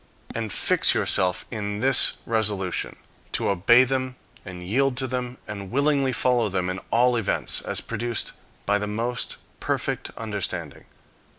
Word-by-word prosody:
And 110 Hz, -2 st, -3 dB
fix -, -, +4 dB
yourself 90 Hz, -1 st, +2 dB
in 105 Hz, -2 st, -4 dB
this 130 Hz, +2 st, +5 dB
resolution, 105 Hz, -5 st, -1 dB, 0.4 s
to -, -, 0 dB
obey 100 Hz, +6 st, +5 dB
them, 130 Hz, 0 st, -2 dB, 0.3 s
and 90 Hz, -3 st, -9 dB
yield 125 Hz, +7 st, +1 dB
to 130 Hz, -, 0 dB
them, 125 Hz, -1 st, -4 dB
and 100 Hz, -2 st, -7 dB
willingly 140 Hz, +1 st, +1 dB
follow 125 Hz, -3 st, +1 dB
them 90 Hz, -1 st, -1 dB
in 95 Hz, -, -5 dB
all 125 Hz, +1 st, +3 dB
events, 115 Hz, -4 st, +1 dB
as -, -, -1 dB
produced 115 Hz, 0 st, -3 dB, 0.3 s
by 105 Hz, 0 st, +2 dB
the 105 Hz, -, -3 dB
most 115 Hz, +4 st, -2 dB, 0.2 s
perfect -, -, -2 dB
understanding. 95 Hz, -8 st, -5 dB
115 Hz, 140 wpm, -24 LUFS, 100-125 Hz, 0.4 s, this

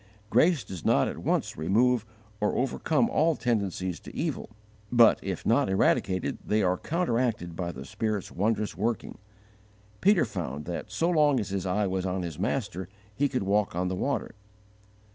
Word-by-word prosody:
Grace 165 Hz, -5 st, +4 dB
does 90 Hz, -4 st, -8 dB
not -, -, +3 dB
at -, -, -5 dB
once -, -, 0 dB
remove 110 Hz, +8 st, +2 dB, 0.3 s
or 105 Hz, -, 0 dB
overcome 150 Hz, -, +1 dB
all 165 Hz, -, +2 dB
tendencies 95 Hz, -8 st, -1 dB
to -, -, -12 dB
evil, 155 Hz, -6 st, -3 dB, 0.4 s
but, 120 Hz, -2 st, +6 dB
if -, -, -4 dB
not -, -, +3 dB
eradicated, 95 Hz, -1 st, +1 dB
they 105 Hz, 0 st, +1 dB
are 90 Hz, 0 st, +2 dB
counteracted 120 Hz, -, -1 dB
by 85 Hz, 0 st, -3 dB
the 65 Hz, -4 st, -9 dB
Spirit's 105 Hz, -, -3 dB
wondrous 105 Hz, +2 st, 0 dB
working. 110 Hz, +2 st, -2 dB, 0.8 s
Peter 200 Hz, -4 st, +5 dB
found 80 Hz, -, -5 dB
that 85 Hz, -1 st, -5 dB
so 165 Hz, -, 0 dB
long 150 Hz, -6 st, +4 dB
as 105 Hz, -, -3 dB
his 95 Hz, -1 st, -2 dB
eye 105 Hz, +3 st, +1 dB
was 95 Hz, -1 st, -1 dB
on 90 Hz, 0 st, -2 dB
His 85 Hz, -3 st, -6 dB
Master 100 Hz, -5 st, -2 dB, 0.2 s
he 140 Hz, +6 st, +1 dB
could 130 Hz, -6 st, -1 dB
walk 100 Hz, -1 st, +1 dB
on 90 Hz, +1 st, 0 dB
the 95 Hz, -, -2 dB
water. 140 Hz, +9 st, -2 dB
105 Hz, 165 wpm, -28 LUFS, 90-125 Hz, 0.8 s, but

